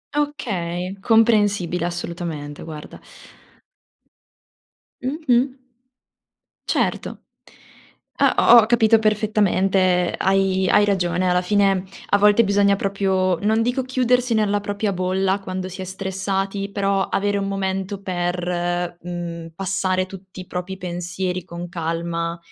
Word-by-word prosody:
Okay, 190 Hz, -11 st, -2 dB
comprensibile. 205 Hz, -6 st, +2 dB
Assolutamente, 170 Hz, -4 st, -5 dB
guarda. 155 Hz, -2 st, -9 dB, 2.0 s
Mh-mh. 260 Hz, -2 st, 0 dB, 1.1 s
Certo. -, -, -1 dB, 1.0 s
Ah -, -, +6 dB
ho -, -, +11 dB
ho -, -, +1 dB
capito 225 Hz, -1 st, +4 dB
perfettamente, 195 Hz, -4 st, +2 dB
hai 190 Hz, -1 st, +2 dB
hai 210 Hz, -, +5 dB
ragione, 180 Hz, -2 st, 0 dB
alla 180 Hz, 0 st, +2 dB
fine 195 Hz, 0 st, +2 dB, 0.2 s
a 205 Hz, -, +4 dB
volte 210 Hz, +3 st, +5 dB
bisogna 200 Hz, -1 st, +3 dB
proprio, 190 Hz, -2 st, 0 dB
non 220 Hz, +2 st, +2 dB
dico 245 Hz, +3 st, 0 dB
chiudersi 250 Hz, -1 st, +1 dB
nella 210 Hz, -2 st, +2 dB
propria 205 Hz, +1 st, -2 dB
bolla 190 Hz, +2 st, 0 dB
quando 185 Hz, -1 st, -5 dB
si 185 Hz, -, -10 dB
è -, -, -4 dB
stressati, 195 Hz, +1 st, -3 dB
però 195 Hz, -1 st, 0 dB
avere 205 Hz, 0 st, 0 dB
un 195 Hz, -, -2 dB
momento 195 Hz, 0 st, -3 dB
per 175 Hz, -1 st, -2 dB
mhmm, 170 Hz, -1 st, -6 dB
passare 185 Hz, 0 st, 0 dB
tutti 190 Hz, 0 st, -11 dB
i 180 Hz, -, -12 dB
propri 180 Hz, +1 st, -5 dB
pensieri 180 Hz, 0 st, -4 dB
con 175 Hz, 0 st, -7 dB
calma, 170 Hz, 0 st, -3 dB
190 Hz, 115 wpm, -21 LUFS, 180-205 Hz, 2.0 s, ho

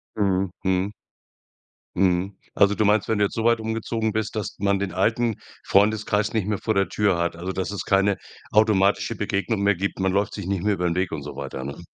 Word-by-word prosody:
Mhm, 95 Hz, -3 st, +1 dB
mhm. 95 Hz, +1 st, +1 dB, 1.0 s
Mhm, 95 Hz, +1 st, +1 dB, 0.2 s
also 100 Hz, +1 st, +4 dB
du 110 Hz, -, +1 dB
meinst, 105 Hz, 0 st, +3 dB
wenn 110 Hz, -, +1 dB
du 105 Hz, -, +3 dB
jetzt -, -, -4 dB
so 110 Hz, -, -2 dB
weit 115 Hz, -1 st, +4 dB
umgezogen 110 Hz, 0 st, -2 dB
bist, 110 Hz, 0 st, -2 dB
dass 105 Hz, -, -3 dB
man 100 Hz, 0 st, +2 dB
den 100 Hz, -2 st, -2 dB
alten 110 Hz, +4 st, +1 dB, 0.3 s
Freundeskreis 105 Hz, +1 st, +2 dB
nicht 105 Hz, -3 st, 0 dB
mehr 105 Hz, -3 st, -1 dB
vor 110 Hz, -, 0 dB
der 95 Hz, 0 st, +2 dB
Tür 100 Hz, -4 st, +1 dB
hat, 85 Hz, -1 st, -1 dB
also, 90 Hz, +3 st, -4 dB
dass 95 Hz, +1 st, -3 dB
es 100 Hz, -, -4 dB
keine 100 Hz, 0 st, +2 dB, 0.3 s
automatische 105 Hz, +1 st, +3 dB
Begegnung 105 Hz, +1 st, -1 dB
mehr 100 Hz, 0 st, +3 dB
gibt. 100 Hz, +2 st, -3 dB
Man 95 Hz, 0 st, +1 dB
läuft 100 Hz, +2 st, 0 dB
sich 100 Hz, -4 st, -6 dB
nicht 95 Hz, -2 st, -1 dB
mehr 105 Hz, -1 st, +2 dB
über 90 Hz, -, -2 dB
'n 85 Hz, 0 st, 0 dB
Weg 95 Hz, +1 st, 0 dB
und 75 Hz, -3 st, -4 dB
so 75 Hz, -2 st, -8 dB
weiter, 70 Hz, -2 st, -6 dB
ne? 70 Hz, +4 st, -6 dB
100 Hz, 220 wpm, -24 LUFS, 95-105 Hz, 1.0 s, also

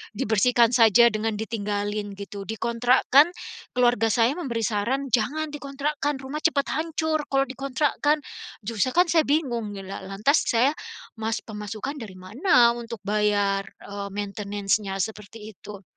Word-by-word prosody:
dibersihkan 230 Hz, +3 st, +3 dB
saja 235 Hz, 0 st, +6 dB
dengan 215 Hz, 0 st, -2 dB
ditinggalin 205 Hz, -1 st, -3 dB
gitu. 200 Hz, 0 st, -8 dB
Dikontrakkan, 245 Hz, -, +3 dB, 0.4 s
keluarga 240 Hz, -3 st, +3 dB
saya 230 Hz, +3 st, +3 dB
memberi 235 Hz, -8 st, -3 dB
saran 240 Hz, +6 st, -1 dB
jangan 290 Hz, +8 st, 0 dB
dikontrakkan, 290 Hz, 0 st, -3 dB
rumah 275 Hz, +3 st, -4 dB
cepat 305 Hz, -3 st, +1 dB
hancur 315 Hz, 0 st, -1 dB
kalau 270 Hz, 0 st, +2 dB
dikontrakkan. 280 Hz, +3 st, 0 dB, 0.4 s
Justru 230 Hz, +4 st, -1 dB
kan 350 Hz, -1 st, +4 dB
saya 320 Hz, -4 st, +3 dB
bingung, 240 Hz, -8 st, -1 dB
la 190 Hz, 0 st, -7 dB
lantas 210 Hz, +10 st, +1 dB
saya 245 Hz, +5 st, +3 dB, 0.5 s
mas 220 Hz, 0 st, -2 dB
pemasukan 215 Hz, +6 st, -6 dB
dari 205 Hz, -5 st, -9 dB
mana 235 Hz, -, +3 dB
untuk 230 Hz, -3 st, -8 dB
bayar, 205 Hz, -1 st, +1 dB, 0.2 s
e 200 Hz, 0 st, -6 dB
maintenance-nya? 200 Hz, -1 st, -2 dB
Seperti 215 Hz, 0 st, -8 dB
itu. 200 Hz, 0 st, -11 dB
230 Hz, 130 wpm, -25 LUFS, 205-275 Hz, 0.5 s, saja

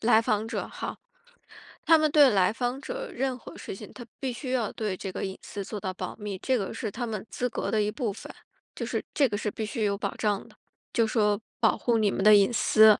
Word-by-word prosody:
来 225 Hz, 0 st, +5 dB
访 220 Hz, -2 st, +1 dB
者 225 Hz, -, -3 dB
哈。 -, -, -5 dB, 0.9 s
他 325 Hz, -, +7 dB
们 310 Hz, -1 st, +3 dB
对 290 Hz, -3 st, +7 dB
来 190 Hz, -1 st, +4 dB
访 245 Hz, +4 st, -2 dB
者 -, -, -5 dB
任 260 Hz, 0 st, -1 dB
何 -, -, -11 dB
事 -, -, -6 dB
情， -, -, -10 dB
他 240 Hz, -, -8 dB, 0.2 s
必 260 Hz, -3 st, -2 dB
须 255 Hz, +1 st, -5 dB
要 235 Hz, -5 st, 0 dB
对 210 Hz, -4 st, -3 dB
这 190 Hz, -, -5 dB
个 -, -, -4 dB
隐 190 Hz, -1 st, -5 dB
私 200 Hz, -, -6 dB
做 210 Hz, +1 st, -5 dB
到 185 Hz, 0 st, -3 dB
保 185 Hz, 0 st, -5 dB
密。 205 Hz, -3 st, -4 dB
这 260 Hz, +4 st, +1 dB
个 195 Hz, 0 st, -3 dB
是 225 Hz, -1 st, -3 dB
他 240 Hz, +3 st, -3 dB
们 215 Hz, -3 st, -4 dB
资 250 Hz, -, -1 dB
格 240 Hz, -, -3 dB
的 215 Hz, -1 st, +2 dB
一 210 Hz, -, 0 dB
部 235 Hz, -6 st, -2 dB
分， -, -, -9 dB, 0.4 s
就 -, -, -3 dB
是 -, -, -2 dB
这 280 Hz, -3 st, +4 dB
个 205 Hz, -, -1 dB
是 210 Hz, -1 st, -2 dB
必 220 Hz, -, -4 dB
须 220 Hz, 0 st, -2 dB
有 200 Hz, -1 st, +2 dB
保 -, -, -3 dB
障 205 Hz, -2 st, 0 dB
的， -, -, -19 dB, 0.4 s
就 230 Hz, -2 st, +4 dB
说 210 Hz, -2 st, +2 dB, 0.2 s
保 -, -, +4 dB
护 235 Hz, -2 st, +2 dB
你 210 Hz, -2 st, +3 dB
们 195 Hz, -, -1 dB
的 215 Hz, 0 st, +8 dB
隐 200 Hz, +3 st, +5 dB
私， 220 Hz, -2 st, +6 dB
220 Hz, 270 characters per minute, -28 LUFS, 205-250 Hz, 0.9 s, 的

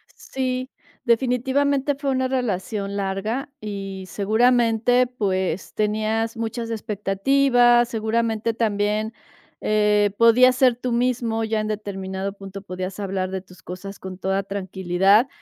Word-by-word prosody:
Sí, 255 Hz, 0 st, -3 dB, 0.4 s
definitivamente 265 Hz, +4 st, +1 dB
fue 280 Hz, -1 st, -2 dB
una 260 Hz, 0 st, +1 dB
relación 205 Hz, -5 st, -2 dB
larga 210 Hz, +8 st, -2 dB
y 195 Hz, -2 st, -6 dB
seguramente, 240 Hz, +3 st, +3 dB
pues, 190 Hz, -7 st, -2 dB
tenías 220 Hz, +2 st, 0 dB
muchas 230 Hz, +1 st, -3 dB
expectativas, 240 Hz, +4 st, +3 dB
seguramente 225 Hz, 0 st, -1 dB
también, 215 Hz, 0 st, 0 dB, 0.5 s
eh, 210 Hz, -1 st, +2 dB
podías 245 Hz, +2 st, +6 dB
ser 250 Hz, -3 st, +3 dB
tú 250 Hz, -1 st, -2 dB
mismo 235 Hz, -2 st, 0 dB
ya 220 Hz, 0 st, 0 dB
en 215 Hz, -, -2 dB
determinado 195 Hz, -2 st, -4 dB
punto, 195 Hz, -1 st, -9 dB
podías 185 Hz, 0 st, -6 dB
hablar 190 Hz, -2 st, -2 dB
de 190 Hz, -1 st, -4 dB
tus 185 Hz, -1 st, -18 dB
cosas 195 Hz, +3 st, -8 dB
con 185 Hz, -1 st, -8 dB
toda 195 Hz, +1 st, -1 dB
tranquilidad, 195 Hz, +3 st, +2 dB
215 Hz, 120 wpm, -23 LUFS, 195-245 Hz, 0.5 s, podías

